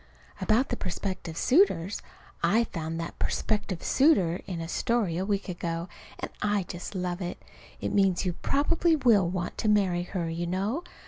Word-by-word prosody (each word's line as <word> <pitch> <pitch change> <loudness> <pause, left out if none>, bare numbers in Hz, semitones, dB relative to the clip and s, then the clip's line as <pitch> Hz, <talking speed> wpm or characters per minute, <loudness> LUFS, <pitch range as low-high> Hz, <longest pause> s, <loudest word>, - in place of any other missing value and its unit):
About 230 +5 +3
the - - 0
prospective 185 -3 -4
suitors 250 - +3 0.4
I 230 +3 +4
found 165 -5 -4
that 165 - -6
"prospective 205 -5 -1
suitor" 195 - +3
in 180 -3 -4
a 165 - -4
story 220 -1 0
a 190 - -1
week 200 -2 0
ago, 170 -1 -3 0.3
and - - -5
I 205 -2 +1
just 175 +3 -7
love 180 0 -2
it. 175 -1 -4 0.4
It - - -2
means 195 -3 +3
you 180 - 0
probably 325 - +2
will 225 - +4
want 180 -1 -3
to - - 0
marry 190 -4 +3
her, 175 -1 -3
you 170 +1 -3
know. 200 - -1
190 Hz, 170 wpm, -28 LUFS, 175-215 Hz, 0.4 s, I